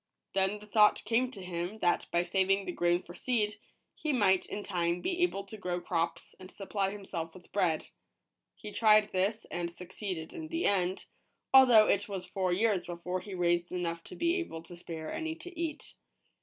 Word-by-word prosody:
Then 195 +1 +2
the 210 - -13
thought 210 0 +4
came 235 +4 +2
to 200 -7 -10
him, 180 +3 -4
that 175 -5 +1
by 170 0 +2
saving 190 +2 +1
the - - -2
grain 175 0 +1
for 175 - -11
seed, 210 -1 -1 0.3
he 305 - -2
might, 195 -8 +3
in 205 - -5
time, 175 -3 0
be 355 - -2
able 275 - +1
to 200 +2 -10
grow 180 -3 -2
crops, 170 -1 -2
and 185 0 -11
supply 195 0 -2
himself 190 -5 -6
with 180 - -15
bread. 175 -6 +1 0.7
He 210 - -9
tried 215 -1 +5
this, 200 +4 0
and 175 -1 -2
succeeded 180 -1 -6
in 320 -2 -6
the 330 +2 -2
end; 185 -2 +1 0.5
although 245 -5 +8
it 205 +1 +1
was 190 -2 -4
four 185 -2 -1
years 195 -1 +2
before 180 +1 -3
he 195 +1 -8
raised 175 -1 +1
enough 170 -2 -2
to - - -9
be 340 +2 +1
able 165 - -5
to 175 +1 -11
spare 165 -2 -6
any 320 0 -3
to 355 +2 -10
eat. 315 -2 -4
195 Hz, 190 wpm, -31 LUFS, 175-215 Hz, 0.7 s, although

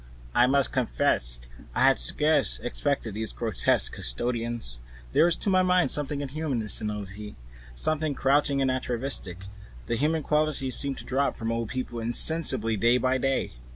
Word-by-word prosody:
I 125 - +5
must 140 0 +2
confess 120 - 0 0.3
I - - +2
had - - +5
scarcely 150 - +1
expected 130 -3 -1
these 110 +1 -3
grotesque 110 -6 +1
custodians. 115 - -2 0.3
There 165 - +5
is, 175 - +2
to - - -3
my 185 0 +4
mind, 180 -5 +3
something 145 -1 0
inhuman 145 -2 -3
in 110 -1 -4
senility, 105 0 -4 0.4
something 155 - 0
crouching 140 0 +2
and 130 - +2
atavistic; 120 -7 -4 0.4
the 120 - -1
human 155 +5 0
qualities 150 -4 0
seem 140 -1 -2
to - - -9
drop 140 +2 0
from 115 -2 -3
old 115 -1 -2
people 125 -2 -4
insensibly 120 -1 +2
day 115 +4 +4
by 130 +1 +1
day. 135 +1 -1
130 Hz, 155 wpm, -27 LUFS, 115-145 Hz, 0.4 s, I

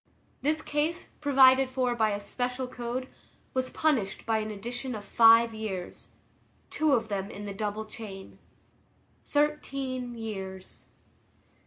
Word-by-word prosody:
This 305 +3 0
case, 305 +4 -1
provided 265 -2 +6
for 255 -1 0
by 220 -2 +2
a 205 -1 -1
special 250 +5 -2
code, 250 +1 -4 0.5
was 255 0 0
punished 250 -11 0
by 225 -1 +2
an 215 0 -3
addition 240 +4 -5
of 205 -1 -7
five 230 +2 +6
years, 205 -5 -5 0.6
two 310 -2 +2
of 230 -4 +2
them 200 -1 -3
in 205 -1 -7
the 200 - -5
double 210 +1 -3
chain. 210 -3 -9 0.8
Thirteen 275 -4 -1
years. 190 -4 -7
235 Hz, 130 wpm, -29 LUFS, 210-260 Hz, 0.8 s, provided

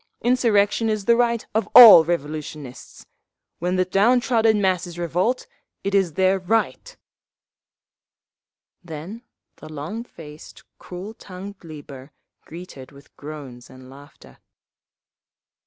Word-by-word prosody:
Insurrection 225 -3 +1
is 215 -2 -3
the 235 - +4
right 235 -1 0
of 215 -1 -1
all 220 -9 +11
revolutionists! 150 -4 -6 0.5
When 180 +2 -2
the 185 0 +1
down 210 +7 +2
trodden 225 -3 +1
masses 180 -3 -1
revolt, 175 +9 -2 0.4
it 200 - -3
is 190 -5 +1
their 190 +3 +1
right…." 225 - -2 1.9
Then 175 +7 -9 0.4
the 155 - -13
long 155 +10 -6
faced, 155 -9 -14 0.2
cruel 185 +4 -9
tongued 195 -1 -11
Lieber, 145 -3 -12 0.3
greeted 165 -6 -11
with 140 0 -19
groans 140 -5 -11
and 130 0 -15
laughter. 140 - -17
180 Hz, 110 wpm, -22 LUFS, 150-215 Hz, 1.9 s, all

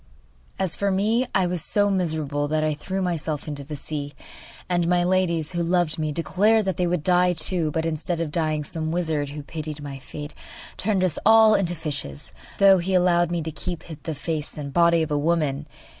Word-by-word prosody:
As 190 -3 -1
for 200 - 0
me, 215 +6 +1
I 190 - +3
was 175 -2 0
so 205 -1 +2
miserable 155 -6 -1
that 155 +1 0
I 155 0 +1
threw 190 +6 -3
myself 160 -4 -2
into 145 -2 -4
the 150 +2 -7
sea, 145 0 -5 0.5
and 175 -2 +1
my 175 0 +3
ladies, 175 -3 +1
who 175 -1 -2
loved 170 -2 +1
me, 155 -1 -1
declared 205 +7 +2
that 190 - -1
they 180 - +1
would 175 -3 -1
die 180 0 +4
too; 165 0 0
but, 160 +2 -2
instead 165 +1 -2
of 165 -3 -2
dying, 155 -2 0
some 155 +2 -4
wizard, 160 -4 -1
who 145 +1 -7
pitied 155 0 -6
my 140 -2 -7
fate, 145 +3 -8 0.4
turned 195 -1 0
us 180 -4 0
all 220 0 +7
into 175 -4 +1
fishes, 140 - -5 0.2
though 195 -1 +6
he 185 +2 -1
allowed 175 -1 +3
me 175 -2 -2
to 160 - -4
keep 175 +2 -5 0.2
the 160 +2 -4
face 155 +1 -4
and 140 -2 -6
body 170 -1 +4
of 155 - -5
a 145 - +1
woman. 150 -2 0
165 Hz, 205 wpm, -24 LUFS, 150-180 Hz, 0.5 s, all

